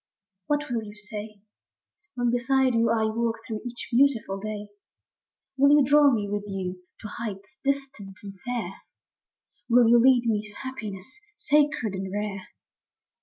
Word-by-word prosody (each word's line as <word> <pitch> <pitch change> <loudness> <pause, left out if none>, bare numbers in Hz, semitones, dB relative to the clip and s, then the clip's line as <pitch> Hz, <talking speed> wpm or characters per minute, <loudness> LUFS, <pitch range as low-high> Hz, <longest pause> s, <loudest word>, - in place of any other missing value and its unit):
What 295 -2 -1
will 235 -2 0
you 210 -1 -10
say 210 0 -8 0.7
When 245 -1 +1
beside 260 +1 +2
you 230 0 +3
I 225 -1 +2
walk 230 +1 0
through 220 -3 -5
each 240 0 -7
beautiful 235 -6 +2
day? 210 0 -5 0.9
Will 280 +2 +6
you 290 - +5
draw 290 +2 +6
me 210 -4 0
with 205 0 -3
you 185 -2 -4 0.2
to 220 - -6
heights 210 +3 -7
distant 270 -8 -3
and 200 -1 -7
fair? 235 -7 -4 0.9
Will 240 0 +6
you 235 0 +6
lead 250 -1 +5
me 215 -3 +1
to 210 0 -12
happiness 245 - -7 0.2
sacred 295 - +2
and 190 0 -4
rare 205 -1 -4
230 Hz, 150 wpm, -26 LUFS, 205-260 Hz, 0.9 s, Will